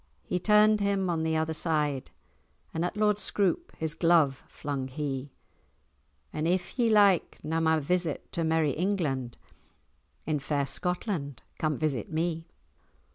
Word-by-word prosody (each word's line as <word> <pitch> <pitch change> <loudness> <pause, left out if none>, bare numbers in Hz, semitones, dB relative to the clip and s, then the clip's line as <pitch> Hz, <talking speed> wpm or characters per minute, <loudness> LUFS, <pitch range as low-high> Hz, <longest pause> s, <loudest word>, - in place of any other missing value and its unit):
He 180 - -2
turn'd 210 +2 +5
him 195 -2 +1
on 165 -1 -1
the 160 0 0
other 160 0 0
side, 150 -4 0 0.6
And 160 - -1
at 180 +4 -2
Lord 210 -1 +2
Scroope 205 - 0
his 160 -1 -2
glove 165 -5 +3
flung 140 -3 -4
he— 135 0 -4 1.0
'If 175 +8 -1
ye 235 -1 +4
like 200 -5 +4
na 160 +1 -1
my 160 0 +3
visit 170 +1 -1
to 170 - -1
merry 160 -2 +2
England, 150 -8 -1 0.9
In 155 -1 0
fair 140 0 -1
Scotland 145 - -3 0.2
come 155 -2 0
visit 145 -7 -2
me! 165 0 -2
160 Hz, 135 wpm, -28 LUFS, 145-185 Hz, 1.0 s, turn'd